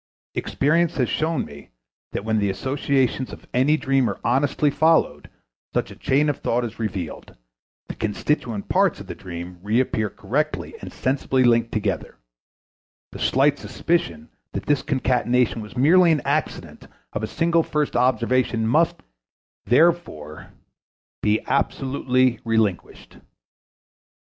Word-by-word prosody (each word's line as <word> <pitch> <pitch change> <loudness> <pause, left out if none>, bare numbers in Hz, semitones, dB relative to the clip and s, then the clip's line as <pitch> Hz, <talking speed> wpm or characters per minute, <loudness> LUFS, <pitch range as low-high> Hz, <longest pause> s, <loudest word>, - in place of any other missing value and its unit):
Experience 165 +4 +1
has 125 -3 +2
shown 160 +1 0
me 70 0 -13 0.4
that 100 - -4
when 110 -1 +1
the 100 -1 +1
associations 135 +2 0
of - - -11
any 135 +5 +3
dream 135 -3 +1
are - - -5
honestly 140 +3 +2
followed 155 - +2 0.5
such - - 0
a - - -10
chain 145 +3 +1
of 145 - 0
thought 120 +1 0
is 115 -1 -8
revealed, 95 -7 -5 0.5
the - - -5
constituent 110 0 -2
parts - - +2
of - - -9
the - - -6
dream 90 0 -8
reappear 110 0 0
correctly 140 +11 -2
and - - -8
sensibly 130 0 0
linked 115 -1 +3
together; 100 -5 -2 1.0
the - - -9
slight 140 +2 +2
suspicion 85 - -2 0.2
that - - -4
this 145 -2 +2
concatenation 125 -3 +1
was 105 +4 -10
merely 170 +6 +5
an 155 - +1
accident - - -3 0.3
of 105 - -3
a 110 - -2
single 170 +5 +2
first 150 -2 -1
observation 125 -1 +1
must, 155 +9 +2 0.6
therefore, 125 - +1 0.7
be 105 +1 +2
absolutely 130 -3 +1
relinquished. 110 -5 -1
125 Hz, 130 wpm, -23 LUFS, 110-145 Hz, 1.0 s, merely